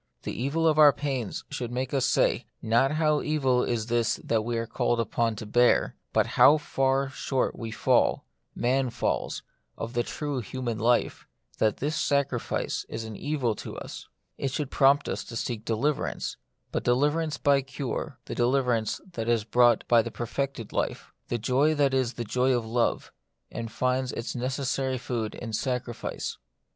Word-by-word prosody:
The -, -, -4 dB
evil 150 Hz, +7 st, 0 dB
of 155 Hz, -1 st, +3 dB
our 150 Hz, -1 st, +9 dB
pains 135 Hz, -7 st, -3 dB
should 120 Hz, -2 st, -4 dB
make 130 Hz, +2 st, -3 dB
us 135 Hz, -2 st, +2 dB
say, -, -, +2 dB
not 120 Hz, +5 st, +2 dB
how 155 Hz, -1 st, +2 dB
evil 135 Hz, -5 st, +2 dB
is 115 Hz, -3 st, -1 dB
this 120 Hz, -1 st, +1 dB
that 110 Hz, -2 st, +1 dB
we 120 Hz, +1 st, -2 dB
are 115 Hz, -, -1 dB
called 120 Hz, +1 st, 0 dB
upon 115 Hz, 0 st, 0 dB
to 110 Hz, -, -7 dB
bear, 120 Hz, +3 st, +3 dB, 0.2 s
but -, -, +3 dB
how 150 Hz, -, +6 dB
far 135 Hz, -2 st, 0 dB
short 135 Hz, 0 st, -1 dB
we 115 Hz, -, -5 dB
fall 110 Hz, -, +2 dB
— -, -, -48 dB
man 130 Hz, 0 st, +2 dB
falls -, -, -2 dB, 0.2 s
— -, -, -46 dB
of 115 Hz, +1 st, -5 dB
the 120 Hz, -, +2 dB
true 145 Hz, +2 st, -3 dB
human 120 Hz, 0 st, -4 dB
life, 120 Hz, +2 st, +1 dB, 0.3 s
that 110 Hz, -1 st, +2 dB
this 150 Hz, +3 st, -1 dB
sacrifice 140 Hz, -4 st, 0 dB
is 110 Hz, -, -4 dB
an 110 Hz, -1 st, -7 dB
evil 135 Hz, -3 st, -1 dB
to -, -, -7 dB
us. -, -, -8 dB, 0.3 s
It 135 Hz, -, 0 dB
should 140 Hz, +1 st, -3 dB
prompt 140 Hz, +1 st, +4 dB
us -, -, -3 dB
to 115 Hz, -, -9 dB
seek 115 Hz, -1 st, -3 dB
deliverance, 135 Hz, +7 st, -1 dB, 0.4 s
but -, -, -2 dB
deliverance 150 Hz, +5 st, +1 dB
by 140 Hz, -1 st, +3 dB
cure: 135 Hz, 0 st, -5 dB
the -, -, -5 dB
deliverance 120 Hz, -3 st, +1 dB
that 115 Hz, -6 st, -3 dB
is 115 Hz, -3 st, +2 dB
brought 120 Hz, +1 st, +3 dB
by 120 Hz, -, +6 dB
a 115 Hz, -, 0 dB
perfected 120 Hz, -1 st, -4 dB
life; -, -, -2 dB, 0.2 s
the 120 Hz, -, -1 dB
joy 130 Hz, +7 st, +2 dB
that 140 Hz, -2 st, +2 dB
is 130 Hz, -2 st, +1 dB
the 120 Hz, -, -4 dB
joy 125 Hz, +4 st, +1 dB
of 115 Hz, -, -3 dB
love, 115 Hz, +1 st, 0 dB, 0.4 s
and 115 Hz, 0 st, -5 dB
finds 130 Hz, +2 st, 0 dB
its 115 Hz, -, -4 dB
necessary 130 Hz, +1 st, -1 dB
food 115 Hz, -3 st, -3 dB
in 115 Hz, -2 st, -6 dB
sacrifice. 125 Hz, 0 st, -3 dB
125 Hz, 175 wpm, -27 LUFS, 115-140 Hz, 0.4 s, our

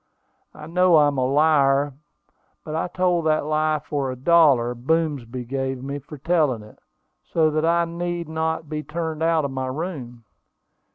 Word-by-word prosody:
I 150 Hz, -, -10 dB
know 180 Hz, +1 st, +4 dB
I'm 145 Hz, -2 st, +3 dB
a 130 Hz, -, +1 dB
liar; 140 Hz, -1 st, +3 dB, 0.7 s
but 155 Hz, -, -6 dB
I 160 Hz, -, -1 dB
told 175 Hz, -2 st, 0 dB
that 155 Hz, -1 st, +1 dB
lie 155 Hz, 0 st, +1 dB
for 140 Hz, -3 st, -2 dB
a -, -, -5 dB
dollar 135 Hz, -4 st, +4 dB
Boomsby 130 Hz, -2 st, -2 dB
gave 135 Hz, 0 st, -3 dB
me 140 Hz, +1 st, -4 dB
for 150 Hz, +2 st, -11 dB
telling 150 Hz, -7 st, +1 dB
it, 105 Hz, -, -16 dB, 0.4 s
so 160 Hz, -2 st, +1 dB
that 155 Hz, +1 st, 0 dB
I 170 Hz, 0 st, +3 dB
need 170 Hz, 0 st, -4 dB
not 160 Hz, 0 st, -2 dB
be 155 Hz, 0 st, -4 dB
turned 160 Hz, 0 st, -4 dB
out 165 Hz, -2 st, +2 dB
of 140 Hz, -, -3 dB
my 130 Hz, 0 st, -3 dB
room. 130 Hz, -5 st, -6 dB
155 Hz, 165 wpm, -23 LUFS, 135-165 Hz, 0.7 s, know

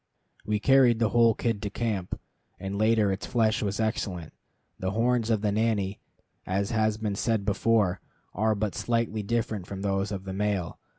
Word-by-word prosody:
We 105 Hz, 0 st, +1 dB
carried 130 Hz, -1 st, +5 dB
the 115 Hz, -1 st, +2 dB
whole 115 Hz, -2 st, +4 dB
kid 115 Hz, -4 st, -1 dB
to 105 Hz, -, -3 dB
camp, 105 Hz, -4 st, -3 dB, 0.4 s
and 95 Hz, 0 st, -4 dB
later 110 Hz, -1 st, +3 dB
its 95 Hz, -, -4 dB
flesh 110 Hz, -3 st, +1 dB
was 100 Hz, 0 st, -2 dB
excellent. 100 Hz, -6 st, -2 dB, 0.5 s
The 95 Hz, -, -1 dB
horns 120 Hz, +1 st, +1 dB
of 110 Hz, -3 st, +2 dB
the 105 Hz, -1 st, +1 dB
nanny, 105 Hz, -2 st, 0 dB, 0.5 s
as 100 Hz, +4 st, -1 dB
has 110 Hz, -1 st, +1 dB
been 110 Hz, -2 st, -2 dB
said 105 Hz, 0 st, 0 dB
before, 100 Hz, -3 st, +2 dB, 0.3 s
are 110 Hz, +2 st, +1 dB
but 105 Hz, -1 st, -2 dB
slightly 115 Hz, -2 st, -1 dB
different 105 Hz, -3 st, -2 dB
from 100 Hz, 0 st, -6 dB
those 100 Hz, 0 st, 0 dB
of 95 Hz, -2 st, -4 dB
the 95 Hz, -1 st, -6 dB
male. 100 Hz, -3 st, -2 dB
105 Hz, 175 wpm, -27 LUFS, 100-115 Hz, 0.5 s, carried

